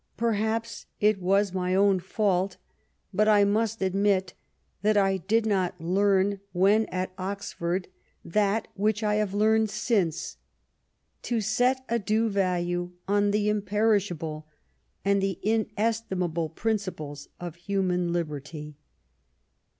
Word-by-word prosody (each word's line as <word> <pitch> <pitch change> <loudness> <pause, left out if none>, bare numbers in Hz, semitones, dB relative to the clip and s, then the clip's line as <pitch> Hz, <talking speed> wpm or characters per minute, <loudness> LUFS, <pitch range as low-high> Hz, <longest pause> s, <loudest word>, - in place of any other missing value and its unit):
Perhaps 225 0 -1
it 210 -2 +3
was 195 +1 +2
my 185 0 0
own 195 -1 +4
fault, 190 0 0 0.6
but 215 +1 +3
I 210 -1 +6
must 215 +1 +1
admit 190 -1 +1 0.5
that 210 +1 +3
I 195 -1 +3
did 215 +5 +1
not 190 -4 0
learn 195 +3 +2
when 200 +4 +3
at 185 0 -3
Oxford 185 -2 -3 0.4
that 205 +4 +1
which 210 +2 0
I 210 0 +2
have 205 -2 -1
learned 220 +1 +3
since, 195 -6 -1 0.8
to 235 -2 -1
set 245 +5 +1
a 235 +1 0
due 220 +3 +1
value 175 -2 -1
on 205 +1 +2
the 210 0 +1
imperishable 200 -7 0 0.6
and 200 0 +3
the 195 -2 -1
inestimable 210 -6 -1
principles 165 -8 -3
of 175 -2 -6
human 180 -1 0
liberty. 150 -2 -4
200 Hz, 120 wpm, -27 LUFS, 180-215 Hz, 0.8 s, I